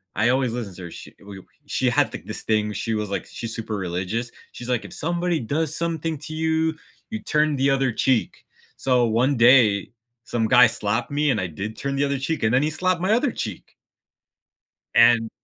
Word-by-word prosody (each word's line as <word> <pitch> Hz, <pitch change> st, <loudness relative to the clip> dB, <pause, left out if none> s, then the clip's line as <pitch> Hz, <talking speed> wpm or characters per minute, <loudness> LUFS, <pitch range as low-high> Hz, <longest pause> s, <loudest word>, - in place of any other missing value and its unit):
I 120 Hz, -, +2 dB
always 130 Hz, -2 st, +1 dB
listened 105 Hz, -7 st, -5 dB
to 90 Hz, -, -9 dB
her. 85 Hz, -, -8 dB
She, -, -, -10 dB
eh, -, -, -29 dB
w 100 Hz, -1 st, -11 dB
uh, -, -, -23 dB, 0.2 s
she -, -, 0 dB
had -, -, +2 dB
thi -, -, -6 dB
this -, -, -6 dB
thing, 105 Hz, -1 st, +1 dB
she 115 Hz, +3 st, -2 dB
was 105 Hz, -2 st, -2 dB
like 100 Hz, -, -3 dB
she's 115 Hz, -1 st, -7 dB
super 110 Hz, -1 st, -4 dB
religious. 95 Hz, +6 st, -3 dB, 0.2 s
She's 125 Hz, +1 st, -8 dB
like, 125 Hz, -2 st, 0 dB
"If -, -, -10 dB
somebody 175 Hz, +1 st, -1 dB
does 150 Hz, +6 st, -2 dB
something 165 Hz, -2 st, -2 dB
to 155 Hz, +1 st, -7 dB
you, 160 Hz, 0 st, 0 dB, 0.3 s
you 220 Hz, -1 st, -4 dB
turn 150 Hz, -1 st, +1 dB
the 135 Hz, +1 st, +2 dB
other 135 Hz, -2 st, +1 dB
cheek." 125 Hz, +1 st, 0 dB, 0.3 s
So 125 Hz, -2 st, +2 dB
one 125 Hz, +5 st, +2 dB
day, 115 Hz, -5 st, +5 dB, 0.3 s
some 115 Hz, -2 st, -1 dB
guy 125 Hz, 0 st, +7 dB
slapped 110 Hz, 0 st, -2 dB
me 145 Hz, 0 st, +2 dB
and 105 Hz, -, 0 dB
I 90 Hz, -, -2 dB
did 100 Hz, +7 st, -6 dB
turn 140 Hz, 0 st, -3 dB
the 140 Hz, -, +1 dB
other 140 Hz, -1 st, -1 dB
cheek 160 Hz, +4 st, -2 dB
and 110 Hz, +1 st, +2 dB
then 125 Hz, -, +4 dB
he 155 Hz, -, +1 dB
slapped 180 Hz, +2 st, 0 dB
my 190 Hz, -, +1 dB
other 245 Hz, +1 st, +2 dB
cheek! 105 Hz, -6 st, -6 dB, 1.2 s
And 115 Hz, -1 st, +5 dB
125 Hz, 215 wpm, -23 LUFS, 110-150 Hz, 1.2 s, guy